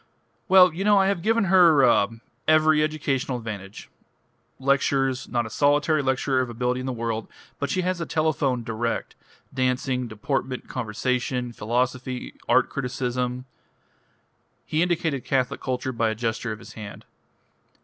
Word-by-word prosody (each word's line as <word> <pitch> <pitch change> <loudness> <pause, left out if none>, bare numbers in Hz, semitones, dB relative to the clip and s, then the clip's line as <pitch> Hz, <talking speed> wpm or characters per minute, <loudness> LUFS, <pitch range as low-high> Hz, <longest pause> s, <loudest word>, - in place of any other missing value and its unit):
Well, 185 -2 +7
you 180 +4 -3
know 205 0 +5
I 195 - +4
have 195 -3 0
given 225 +3 +2
her 170 -7 +6
ah 110 -4 +4 0.4
every 155 0 +5
educational 140 -4 -1
advantage. 105 -4 -8 0.7
Lectures 135 -1 +1
not 120 -1 -1
a - - -6
solitary 145 +4 +2
lecturer 130 0 +1
of 125 - -3
ability 125 +2 -1
in 130 - -5
the - - -1
world 115 -2 -3 0.3
but 140 - -2
she 185 - 0
has 180 0 -1
had 165 - -4
a - - -24
telephone 145 -6 0
direct, 115 +1 -3 0.4
dancing, 125 0 0
deportment, 130 +4 -3
conversation, 125 +1 -2
philosophy, 125 +3 -2 0.2
art 125 +1 +4
criticism 125 -1 -3 0.6
..." - - -43
He 155 - 0
indicated 165 -6 0
catholic 130 -2 -1
culture 130 0 -2
by 115 -2 0
a 110 - -2
gesture 115 0 -2
of 110 - -5
his 115 - -13
hand. 105 -2 -9
130 Hz, 150 wpm, -24 LUFS, 120-150 Hz, 0.7 s, Well